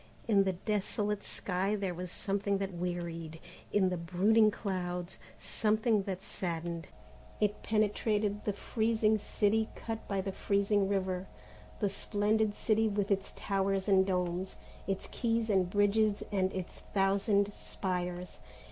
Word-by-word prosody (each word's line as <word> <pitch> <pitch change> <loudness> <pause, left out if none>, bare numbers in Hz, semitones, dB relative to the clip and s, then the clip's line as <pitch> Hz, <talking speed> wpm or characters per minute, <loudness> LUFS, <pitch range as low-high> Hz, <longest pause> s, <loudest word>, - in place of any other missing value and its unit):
In 200 -3 +4
the 190 - +1
desolate 210 +2 -1
sky 190 +2 -1
there 195 -3 -2
was 180 +1 -5
something 200 +2 0
that 195 -1 -3
wearied, 170 -2 -4 0.3
in 195 -2 +3
the 180 - -1
brooding 195 +6 +4
clouds, 180 -4 -3 0.2
something 215 0 +1
that 190 -1 -4
saddened. 170 -3 -4 0.5
It 210 -1 +1
penetrated 210 -1 +1
the 210 - 0
freezing 220 0 +1
city 215 +2 +1
cut 225 -1 -5
by 195 -1 0
the 195 0 -3
freezing 200 0 +1
river, 190 -2 -1 0.5
the 205 - +2
splendid 210 +1 +1
city 220 0 +2
with 205 -1 -1
its 195 -1 0
towers 195 -1 0
and 190 -2 +6
domes, 180 0 -1 0.3
its 195 -1 -2
quays 230 -2 0
and 185 -3 +3
bridges 205 +1 +3
and 190 -2 +1
its 185 -2 -6 0.2
thousand 200 +1 +3
spires. 180 -2 -4
200 Hz, 135 wpm, -32 LUFS, 185-210 Hz, 0.5 s, and